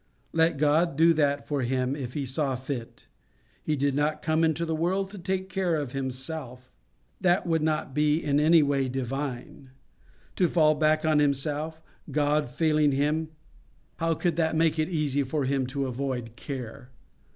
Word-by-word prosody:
Let 165 -1 +3
God 150 +2 +2
do 165 +1 +6
that 145 -2 0
for 145 -2 -1
Him 130 +1 0
if 130 -4 -6
He 145 -2 -2
saw 135 +1 0
fit. 130 -2 -6 0.6
He 155 - -1
did 140 0 0
not 150 +2 0
come 160 +1 +1
into 160 +1 +1
the 165 - -2
world 190 +5 -1
to 205 - -9
take 190 +1 -2
care 185 -3 0
of 145 -5 -3
Himself. 130 -1 -5 0.5
That 180 0 +2
would 165 -2 +1
not 155 -3 -1
be 150 +1 +2
in 145 -3 +1
any 160 +1 +5
way 140 -2 0
divine. 135 +1 -5 0.7
To 180 - +4
fall 155 -3 +4
back 155 +1 +2
on 155 -1 +3
Himself, 150 +3 -1 0.3
God 150 -2 +1
failing 150 +1 +2
Him—how 155 +2 -3
could 170 0 -1
that 160 -1 +1
make 160 0 +2
it 155 +2 0
easy 150 -5 0
for 140 +1 -1
Him 135 -1 0
to 135 +1 -2
avoid 125 -3 -4
care? 125 +1 -7
150 Hz, 165 wpm, -27 LUFS, 135-160 Hz, 0.7 s, do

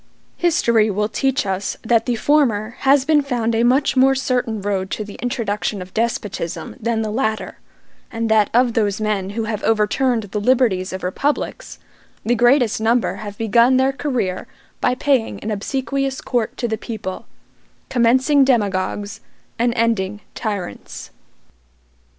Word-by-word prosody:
History 235 -11 +2
will 210 +1 -1
teach 270 0 0
us 195 0 -2
that 225 +1 +2
the 245 - +1
former 230 -5 +2
has 275 0 +3
been 305 -1 +4
found 240 -5 -1
a 225 - +1
much 255 +5 +2
more 265 +1 +5
certain 250 -4 -1
road 195 -1 -2
to 215 - -3
the 205 -1 -10
introduction 220 -4 -2
of 180 0 -9
despotism 215 -6 -3
than 225 0 -1
the 215 - -3
latter, 220 -2 -2 0.5
and 225 0 -2
that 215 -2 +3
of 245 0 +3
those 210 -2 0
men 205 -3 -1
who 225 - 0
have 215 -1 -3
overturned 225 +2 +1
the 205 +1 -4
liberties 215 -6 +2
of 190 0 -6
republics, 275 +11 -2 0.5
the 235 - +2
greatest 240 -1 +3
number 230 +2 +1
have 205 -1 -8
begun 235 +3 +4
their 265 +1 +2
career 235 -10 -2 0.3
by 250 - +1
paying 260 -3 0
an 215 - -3
obsequious 270 +5 -2
court 240 -4 -2
to 240 - -1
the 220 -1 -3
people; 215 -5 -6 0.6
commencing 260 +4 +4
demagogues, 205 -3 0 0.4
and 240 +1 +2
ending 210 -3 0
tyrants. 200 - -5
225 Hz, 150 wpm, -20 LUFS, 210-255 Hz, 0.6 s, more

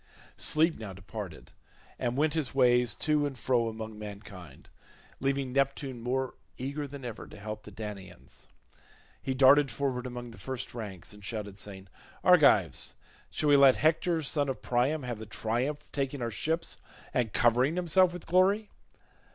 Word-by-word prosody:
Sleep 160 +2 +2
now 105 -4 -6
departed 95 -2 -8 0.5
and 125 0 -1
went 150 +1 +2
his 155 -5 -2
ways 125 -4 +4
to 150 +6 +2
and 135 -2 -7
fro 120 0 +1
among 110 -1 -7
mankind, 100 -7 -10 0.5
leaving 135 -1 -1
Neptune 135 -2 0
more 130 +2 -1 0.2
eager 140 +3 -3
than 140 -2 -9
ever 120 -3 -6
to - - -12
help 105 +1 -6
the 105 - -12
Danaans. 100 -4 -9 0.7
He 130 - -2
darted 135 +2 +6
forward 125 +1 -2
among 120 -1 -7
the 115 - -13
first 130 +5 -5
ranks 105 -6 -7
and 105 0 -14
shouted 105 -1 -5
saying, 95 -2 -8 0.4
"Argives, - - +4 0.3
shall 150 - 0
we 145 - +7
let 135 -2 +7
Hector 165 +1 +2
son 145 0 0
of 135 - -4
Priam 130 +5 +1
have 120 -3 -4
the 110 - -8
triumph 125 +8 -2
of - - -27
taking 135 -2 -2
our 115 - -2
ships 165 +8 -2 0.4
and 120 -4 +1
covering 125 +8 +3
himself 180 +1 +4
with 180 -1 -8
glory? 195 +5 +3
125 Hz, 160 wpm, -30 LUFS, 110-145 Hz, 0.7 s, we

